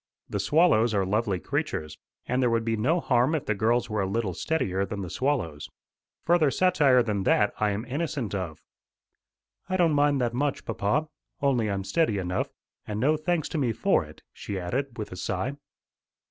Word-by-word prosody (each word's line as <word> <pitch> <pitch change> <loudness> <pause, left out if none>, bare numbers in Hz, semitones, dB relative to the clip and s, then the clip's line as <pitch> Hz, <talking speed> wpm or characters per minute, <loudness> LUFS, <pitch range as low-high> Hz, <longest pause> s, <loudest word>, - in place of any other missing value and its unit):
The 100 - -3
swallows 115 - +3
are 100 -1 +2
lovely 100 -1 0
creatures, 75 -3 -3 0.3
and 125 +1 0
there 125 - +3
would 115 -1 0
be 115 -1 +1
no 140 +11 +1
harm 130 +1 +2
if 150 - -3
the 110 - +1
girls 115 +3 +1
were 105 -1 -1
a 95 - 0
little 100 -1 -1
steadier 95 - -1
than 100 0 -4
the 90 - -6
swallows. 120 - -1 0.6
Further 170 -3 +4
satire 145 -7 +4
than 105 -3 -1
that 105 +2 +3
I 105 - +2
am 105 +3 -3
innocent 140 -4 -3
of." 90 -6 -4 1.1
"I 185 - +1
don't 170 -4 +3
mind 145 -1 +3
that 120 -2 0
much, 140 +2 -1
papa. 135 +10 0 0.3
Only 130 -7 +1
I'm 100 -1 -2
steady 110 - +1
enough, 90 -1 -2 0.4
and 105 0 -3
no 145 +6 +3
thanks 155 +1 -1
to 160 - -2
me 125 -5 +1
for - - +2
it," - - -14
she 100 - -5
added 125 +8 -3
with 105 - -5
a - - -6
sigh. 95 +7 -2
115 Hz, 190 wpm, -27 LUFS, 100-145 Hz, 1.1 s, Further